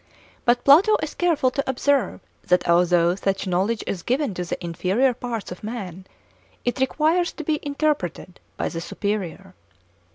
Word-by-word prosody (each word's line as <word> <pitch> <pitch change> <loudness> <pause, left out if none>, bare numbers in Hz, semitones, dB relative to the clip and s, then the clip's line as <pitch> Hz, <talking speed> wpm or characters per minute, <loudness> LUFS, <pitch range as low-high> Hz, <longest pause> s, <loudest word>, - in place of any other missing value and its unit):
But 245 0 +3
Plato 370 +10 +6
is - - -4
careful 320 -7 +1
to 275 +1 -2
observe 270 -3 +1 0.3
that 180 0 +2
although 170 0 +4
such 195 +1 -2
knowledge 195 +5 0
is 180 - -3
given 255 - 0
to 180 - -3
the 175 - -4
inferior 190 +10 +1
parts 235 -5 -5
of 180 - -9
man, 190 -5 -6 0.6
it 245 +2 -1
requires 315 +6 +2
to 315 - -7
be 305 0 0
interpreted 280 - -2 0.2
by - - -1
the 165 - -5
superior. 195 -1 -4
230 Hz, 155 wpm, -23 LUFS, 180-280 Hz, 0.6 s, Plato